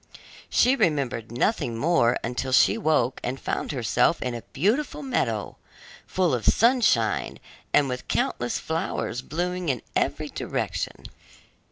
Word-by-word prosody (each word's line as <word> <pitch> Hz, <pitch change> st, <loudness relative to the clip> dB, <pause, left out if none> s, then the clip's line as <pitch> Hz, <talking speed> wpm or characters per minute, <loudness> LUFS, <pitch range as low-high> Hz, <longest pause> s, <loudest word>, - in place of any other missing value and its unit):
She 255 Hz, +2 st, +4 dB
remembered 140 Hz, -, 0 dB
nothing 120 Hz, -, 0 dB
more 135 Hz, -4 st, +3 dB
until 125 Hz, +2 st, -3 dB
she 130 Hz, -, +5 dB
awoke 155 Hz, -, +1 dB
and 130 Hz, +2 st, -3 dB
found -, -, -3 dB
herself 125 Hz, +3 st, +2 dB
in 125 Hz, -, -3 dB
a 120 Hz, -, -5 dB
beautiful 225 Hz, -, 0 dB
meadow, 115 Hz, -, -1 dB, 0.5 s
full 180 Hz, -5 st, +1 dB
of 120 Hz, -3 st, -1 dB
sunshine, 230 Hz, -, +3 dB, 0.3 s
and 145 Hz, -, +4 dB
with 125 Hz, -1 st, -5 dB
countless 120 Hz, 0 st, -1 dB
flowers 160 Hz, -6 st, -3 dB
blooming 180 Hz, +3 st, -3 dB
in 125 Hz, -4 st, -1 dB
every -, -, 0 dB
direction. -, -, -3 dB
135 Hz, 130 wpm, -25 LUFS, 120-180 Hz, 0.5 s, she